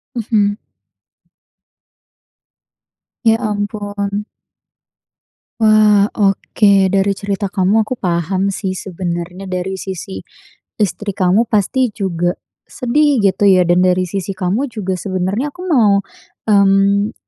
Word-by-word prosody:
Mhm. 210 -3 0 2.7
Ya 225 -1 +4
ampun. 205 -2 -3 1.3
Wah, 215 -2 +5
oke 200 0 +2 0.2
dari 195 +1 +1
cerita 200 0 -3
kamu 200 +4 +2
aku 215 - -4
paham 185 +2 -1
sih, 190 -1 -3
sebenarnya 180 0 -5
dari 185 +1 -3
sisi 185 - -6 0.6
istri 200 0 -2
kamu 195 +4 +2
pasti 235 +5 +1
juga 175 -3 -1 0.3
sedih 280 0 +1
gitu 195 0 +2
ya, 185 -2 +5
dan 175 +1 +3
dari 185 0 +2
sisi 195 +2 -4
kamu 195 +10 -1
juga 195 -6 -4
sebenarnya 190 - -2
aku 355 - -10
mau, 225 - +3 0.5
mmm, 200 +1 +3
200 Hz, 105 wpm, -17 LUFS, 185-215 Hz, 2.7 s, Wah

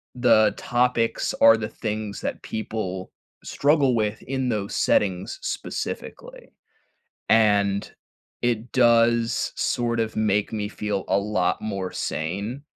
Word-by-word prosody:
the 120 -3 +4
topics 120 -1 0
are 115 0 +8
the 110 -1 -4
things 110 -2 -4
that - - -4
people 95 -4 -4 0.3
struggle 140 -3 +2
with 110 -1 -1
in 130 -1 -2
those 105 -3 -2
settings 95 -3 +1
specifically. - - -6 0.8
And, 100 -3 +3 0.5
it 120 0 -1
does, 115 -1 +3
sort 120 -1 0
of, 110 -1 -2
make 105 -1 +1
me 105 -2 -2
feel 105 -2 -3
a 95 - +3
lot 100 -3 0
more 100 -4 -3
sane 100 - -3
110 Hz, 120 wpm, -24 LUFS, 100-120 Hz, 0.8 s, are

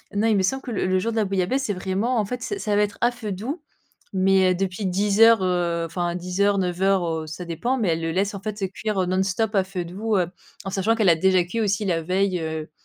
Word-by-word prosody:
non, 210 +2 +1
il 220 - +3
me 195 - +2
semble 265 +8 -1
que 245 - -6
le 195 - -1
le 185 0 +2
jour 230 +5 -1
de 225 - -4
la 215 - +2
bouillabaisse, 195 +8 0
c'est 205 - -1
vraiment, 195 +7 -1
en 210 - +1
fait, 245 +3 -5
c'est 405 - -3
ça 210 - -1
va 205 - +3
être 205 -1 -1
à 240 +1 +4
feu 225 -4 -6
doux 255 - -4 0.5
mais 190 -1 +3
heu, - - -3
depuis 190 +1 -2
10 200 +3 +1
heures, 225 -4 +7
heu, 175 -2 0
enfin, 175 +1 -2
10 180 +2 -3
heures, 200 0 +3
9 180 -1 -2
heures, 195 -2 +3
heu, 160 -1 -3
ça 165 +3 -7
dépend. 235 +11 -1
Mais 215 -7 0
elle 165 0 0
le 165 - -2
laisse, 195 +4 0
en 200 - -7
fait, 205 -2 -3
cuire, 210 -1 -3
heu, 185 - +2
non-stop 190 +4 0
à 195 -2 +3
feu 185 -2 -5
doux, 205 +4 -1
heu, 180 - +1 0.4
en 195 - -3
sachant 200 +4 +1
qu'elle 215 -5 +3
a 165 - +6
déjà 185 +2 +3
cuit 200 +7 -3
aussi 205 0 0
la 165 -3 0
veille, 185 +2 0
heu. 160 -1 -4
195 Hz, 275 wpm, -23 LUFS, 180-215 Hz, 0.5 s, heures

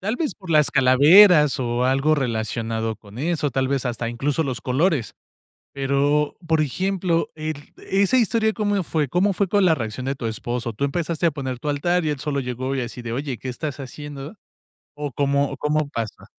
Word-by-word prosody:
Tal 220 +6 -2
vez, 315 -4 -2
por 185 -4 -10
las 150 -2 +4
calaveras 150 +4 +6
o 120 0 0
algo 135 +4 +3
relacionado 115 -3 -2
con 105 +1 -14
eso, 155 0 0
tal 130 +1 0
vez, 135 -1 -1
hasta 120 -1 -3
incluso 135 +6 -1
los 130 -4 -3
colores, 135 - 0 0.6
pero, 140 +2 +1
por 160 -1 +2
ejemplo, 180 +3 -1
el, 155 -2 -6 0.2
¿esa 200 +6 +3
historia 225 -2 +2
cómo 205 -3 0
fue? 155 -4 -1
¿Cómo 185 +7 +2
fue 195 +1 0
con 200 +1 +3
la 165 - +5
reacción 120 -1 -5
de 135 - -1
tu 130 - -9
esposo? 120 +1 -3
Tú 110 - -3
empezaste 165 +3 -1
a - - +4
poner 130 -4 -5
tu 150 - -5
altar 175 +4 +1
y - - +1
él 145 - -3
solo 145 -2 -1
llegó 130 +1 -3
y 135 - -1
así 120 0 -6
de, 115 -1 -5
oye, 135 0 -3
¿qué 130 - -7
estás 145 +2 -5
haciendo? 145 - -8 0.6
¿O 145 -2 -4
cómo 140 +1 +1
o - - -6
cómo 150 0 0
pasa? 115 -6 -5
145 Hz, 200 wpm, -22 LUFS, 125-165 Hz, 0.6 s, calaveras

